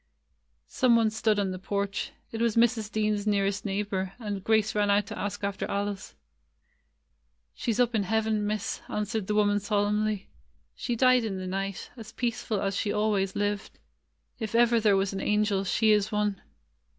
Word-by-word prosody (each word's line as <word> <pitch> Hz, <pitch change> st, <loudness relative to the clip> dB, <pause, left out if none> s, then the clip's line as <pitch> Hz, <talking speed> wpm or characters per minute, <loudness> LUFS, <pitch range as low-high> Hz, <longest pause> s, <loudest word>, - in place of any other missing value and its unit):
Some 245 Hz, -, +3 dB
one 225 Hz, -2 st, +3 dB
stood 215 Hz, 0 st, +1 dB
on 200 Hz, -2 st, 0 dB
the 185 Hz, -, -5 dB
porch; 200 Hz, +1 st, -2 dB, 0.2 s
it 225 Hz, -, -4 dB
was 235 Hz, -2 st, +2 dB
Mrs. 230 Hz, -2 st, +2 dB
Dean's 215 Hz, -1 st, 0 dB
nearest 200 Hz, 0 st, +1 dB
neighbor, 195 Hz, -2 st, -2 dB
and 205 Hz, -5 st, -5 dB
Grace 220 Hz, 0 st, +2 dB
ran 205 Hz, -1 st, +1 dB
out 200 Hz, 0 st, +3 dB
to -, -, -7 dB
ask 205 Hz, 0 st, -4 dB
after 200 Hz, 0 st, -2 dB
Alice. 200 Hz, -, -3 dB, 1.4 s
"She 235 Hz, -, -2 dB
's 225 Hz, -, -2 dB
up 245 Hz, -1 st, +3 dB
in 220 Hz, -, +2 dB
heaven. 215 Hz, +1 st, 0 dB
Miss," 210 Hz, -1 st, -2 dB
answered 210 Hz, -1 st, -2 dB
the 210 Hz, -, 0 dB
woman 205 Hz, -1 st, +3 dB
solemnly. 210 Hz, 0 st, 0 dB, 0.5 s
"She 235 Hz, -, -3 dB
died 255 Hz, 0 st, +4 dB
in 205 Hz, -4 st, -3 dB
the 185 Hz, -, -5 dB
night, 195 Hz, 0 st, -4 dB
as 225 Hz, -1 st, -10 dB
peaceful 235 Hz, -3 st, -2 dB
as 195 Hz, 0 st, -1 dB
she 205 Hz, 0 st, -1 dB
always 210 Hz, -3 st, 0 dB
lived. 205 Hz, 0 st, -2 dB, 0.6 s
If 220 Hz, 0 st, -4 dB
ever 235 Hz, 0 st, +5 dB
there 210 Hz, -3 st, +4 dB
was 195 Hz, 0 st, 0 dB
an 195 Hz, -, -3 dB
angel, 210 Hz, -2 st, +1 dB
she 220 Hz, +3 st, +3 dB
is 210 Hz, -1 st, +2 dB
one." 210 Hz, -2 st, 0 dB
210 Hz, 175 wpm, -28 LUFS, 200-220 Hz, 1.4 s, ever